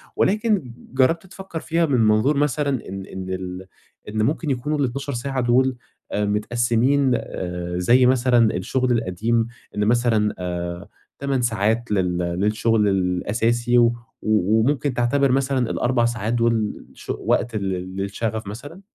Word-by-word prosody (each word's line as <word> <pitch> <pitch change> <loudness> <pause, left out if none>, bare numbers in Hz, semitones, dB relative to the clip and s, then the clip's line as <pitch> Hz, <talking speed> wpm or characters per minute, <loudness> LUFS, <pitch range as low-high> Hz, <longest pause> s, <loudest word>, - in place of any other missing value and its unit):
ولكن 205 - +1 0.2
جرّبت 135 +7 +2
تفكّر 190 -2 -7
فيها 165 +1 +1
من 135 -5 +1
منظور 110 +6 +3
مثلًا 140 -4 0
إن 95 0 -6
إن 95 -1 -7
ال 95 0 -5 0.4
إن 110 0 -1
ممكن 150 +5 -1
يكونوا 140 +3 -1
ال12 140 +1 -2
ساعة 130 +2 -2
دُول، 130 +2 +2 0.4
آآ، 105 - 0
متقسمين 120 +5 +2 0.6
زي 120 +8 +4
مثلًا 125 -3 +3
الشغل 125 +7 0
القديم 115 +1 0 0.3
إن 105 0 +1
مثلًا 115 -2 +2
آآ 85 -1 -4 0.3
8 140 -2 0
ساعات 115 0 0
لل 90 -3 +1
للشغل 105 +5 +1
الأساسي 110 +6 +1
و 120 - +6 0.4
و 110 0 +2
وممكن 140 +2 +1
تعتبر 130 +3 +2
مثلًا 130 -2 +1
ال4 120 -1 +1
ساعات 115 -1 -1
دُول 115 -3 0
ش - - -15
وقت 120 - 0
لل 95 -2 -3
للشغف 105 +3 -3
مثلًا، 145 - -9
120 Hz, 135 wpm, -22 LUFS, 105-130 Hz, 0.6 s, و